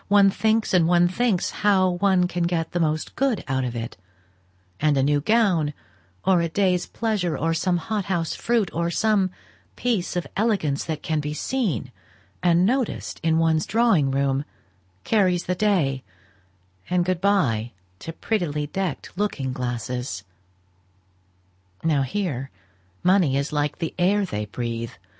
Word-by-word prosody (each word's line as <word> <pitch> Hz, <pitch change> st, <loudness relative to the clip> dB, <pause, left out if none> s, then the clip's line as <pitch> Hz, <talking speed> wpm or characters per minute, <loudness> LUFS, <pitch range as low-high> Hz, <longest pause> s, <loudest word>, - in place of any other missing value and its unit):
One 200 Hz, -1 st, +5 dB
thinks 220 Hz, +1 st, +1 dB
and 175 Hz, -3 st, +4 dB
one 175 Hz, 0 st, +4 dB
thinks 195 Hz, 0 st, 0 dB
how 190 Hz, -3 st, +3 dB
one 180 Hz, 0 st, +2 dB
can 175 Hz, -1 st, -1 dB
get 170 Hz, -2 st, -1 dB
the 175 Hz, -, -1 dB
most 155 Hz, -1 st, -1 dB
good 265 Hz, -7 st, 0 dB
out 130 Hz, -1 st, 0 dB
of 120 Hz, -1 st, -3 dB
it; 115 Hz, -4 st, -5 dB, 0.8 s
and 150 Hz, -1 st, +2 dB
a 135 Hz, -, +3 dB
new 145 Hz, +1 st, +2 dB
gown, 175 Hz, -7 st, +2 dB, 0.5 s
or 185 Hz, -3 st, +4 dB
a 170 Hz, -, -1 dB
day's 180 Hz, 0 st, +1 dB
pleasure, 200 Hz, -9 st, -1 dB
or 165 Hz, +3 st, 0 dB
some 175 Hz, +2 st, +1 dB
hot 210 Hz, +3 st, -3 dB
house 170 Hz, -4 st, -1 dB
fruit, 230 Hz, -5 st, 0 dB
or 170 Hz, +1 st, 0 dB
some 200 Hz, +1 st, +2 dB, 0.5 s
piece 220 Hz, -8 st, -1 dB
of 175 Hz, -, -1 dB
elegance 195 Hz, -10 st, 0 dB
that 155 Hz, -2 st, -4 dB
can 155 Hz, -3 st, 0 dB
be 150 Hz, 0 st, -3 dB
seen 210 Hz, -, -2 dB, 0.5 s
and 175 Hz, 0 st, +4 dB
noticed 250 Hz, +2 st, -1 dB
in 160 Hz, -1 st, +2 dB
one's 160 Hz, -1 st, +2 dB
drawing 220 Hz, -11 st, +3 dB
room, 135 Hz, 0 st, 0 dB, 0.6 s
carries 185 Hz, -5 st, +2 dB
the 180 Hz, -, -1 dB
day, 175 Hz, -10 st, +1 dB, 0.9 s
and 180 Hz, -1 st, +2 dB
good 180 Hz, -1 st, -1 dB
by 125 Hz, -, +1 dB, 0.3 s
to 165 Hz, -, -6 dB
prettily 165 Hz, -6 st, -2 dB
decked 180 Hz, 0 st, -4 dB
looking 160 Hz, -10 st, -2 dB
glasses. 125 Hz, -4 st, -4 dB, 1.6 s
Now 155 Hz, -4 st, +2 dB
here, 135 Hz, -3 st, -2 dB, 0.5 s
money 180 Hz, -7 st, +3 dB
is 140 Hz, +2 st, -2 dB
like 145 Hz, 0 st, 0 dB
the 165 Hz, -, -3 dB
air 200 Hz, +3 st, +3 dB
they 105 Hz, -, -3 dB
breathe. 115 Hz, +1 st, -4 dB
175 Hz, 150 wpm, -24 LUFS, 145-195 Hz, 1.6 s, One